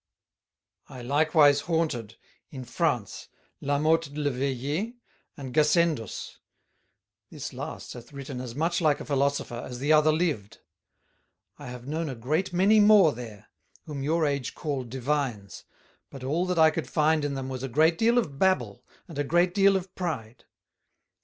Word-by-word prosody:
"I 125 -2 -9
likewise 145 +1 +4
haunted, 150 -11 -2 0.3
in 130 -3 -8
France, - - -2 0.3
La 140 0 0
Mothe 160 +2 +2
le 145 -1 0
Vayer 140 - -2 0.4
and 135 -4 -7
Gassendus; 150 - +1 0.9
this - - -7
last - - -7
hath 120 -1 -12
written 140 -2 -7
as 120 -2 -7
much 165 +4 0
like 150 -3 +2
a - - -7
Philosopher, 140 -4 -1
as 125 - -7
the 145 +5 +2
other 155 0 +5
lived: 145 - -1 1.0
I - - -9
have 125 0 -8
known 155 +3 -3
a 130 - -5
great 155 +12 -1
many 195 +5 +4
more 205 -7 +6
there, 110 -3 -10 0.4
whom 145 -3 -6
your 160 +3 +1
Age 140 -3 -2
call 140 -5 -3
Divines 125 -5 -3 0.4
but 135 -2 -10
all 160 +7 0
that 180 -1 -1
I 160 -1 +6
could - - -4
find 155 -1 +2
in 145 -1 -2
them 135 -1 -4
was 130 -1 -5
a 135 - -4
great 160 +6 +3
deal 235 +2 +3
of 145 - -1
Babble 130 - +1 0.2
and 160 -4 -8
a - - +2
great 175 +4 +2
deal 195 0 +4
of 190 0 -3
Pride. 120 -10 -5
145 Hz, 160 wpm, -27 LUFS, 130-165 Hz, 1.0 s, more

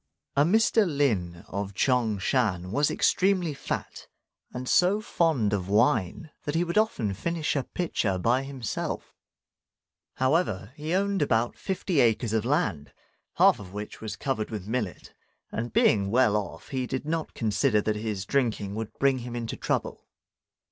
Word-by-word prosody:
A 140 - +5
Mr. 220 +5 +4
Lin 105 - 0
of 100 0 -4
Ch'ang 120 -3 +2
shan 95 -6 0
was 145 +6 +2
extremely 185 -4 +2
fat, 140 - -5 0.4
and 125 +1 -6
so 185 +8 +4
fond 160 - +1
of 95 -2 -2
wine 110 - +1
that 145 - -2
he 170 - +3
would 170 0 -3
often 125 - 0
finish 160 - -2
a 135 -3 0
pitcher 110 - -1
by 120 +8 +2
himself. 135 -4 -4 1.0
However, 130 - +1
he 155 +4 -2
owned 200 -1 +1
about 120 -4 +1
fifty 185 -4 -1
acres 115 -2 +2
of 110 0 +1
land, 130 - 0 0.4
half - - +5
of 95 -2 -10
which 105 +1 -7
was 110 -1 -5
covered 130 -6 -2
with 105 -3 -6
millet, 110 -6 -3 0.4
and 120 +1 -3
being 100 -2 +3
well 115 -1 +3
off, 90 -5 -4
he 130 -3 -2
did 130 +2 -3
not 160 0 -3
consider 110 +1 +2
that 105 +1 0
his 105 -3 -3
drinking 110 -6 0
would 110 0 -4
bring 135 -1 +2
him 120 0 -6
into 115 -1 -4
trouble. - - -3
120 Hz, 155 wpm, -27 LUFS, 105-150 Hz, 1.0 s, A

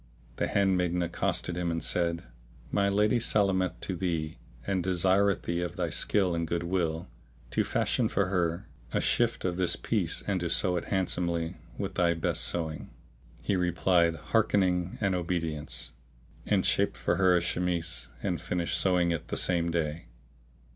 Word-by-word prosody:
The - - 0
handmaid 90 -3 +2
accosted 85 0 -1
him 90 -1 -1
and 85 0 -2
said, 85 -1 0 0.5
"My 100 -1 +2
lady 105 +4 +3
salameth 95 -5 +1
to 95 - -2
thee 80 -5 -2 0.3
and 95 -2 0
desireth 95 +2 +2
thee, 85 +1 -1
of 90 0 -3
thy 85 -3 -2
skill 95 -4 +2
and 85 -1 -1
good 85 +1 -1
will, 85 -2 -1 0.4
to - - +2
fashion - - 0
for 100 - +1
her 85 -3 0 0.2
a - - +1
shift - - +1
of 90 -1 -1
this 90 -2 +2
piece 95 -8 -1
and 100 -2 0
to 85 -1 -2
sew 90 +2 +2
it 85 - -3
handsomely 85 -3 -1 0.2
with - - -3
thy 85 -1 +2
best 80 - +1
sewing. 80 -3 -2 0.5
He 100 - +1
replied, 90 -1 +2
"Hearkening 95 -1 +1
and 100 -3 +1
obedience"; 85 -4 -2 0.6
and - - +2
shaped - - +1
for - - 0
her 95 -2 +5
a - - +4
chemise 90 -1 -2 0.2
and 90 -4 -1
finished 85 -1 -1
sewing 90 -2 +2
it 85 - -3
the - - -3
same 85 -1 +1
day. 80 -1 -2
90 Hz, 160 wpm, -29 LUFS, 85-95 Hz, 0.6 s, her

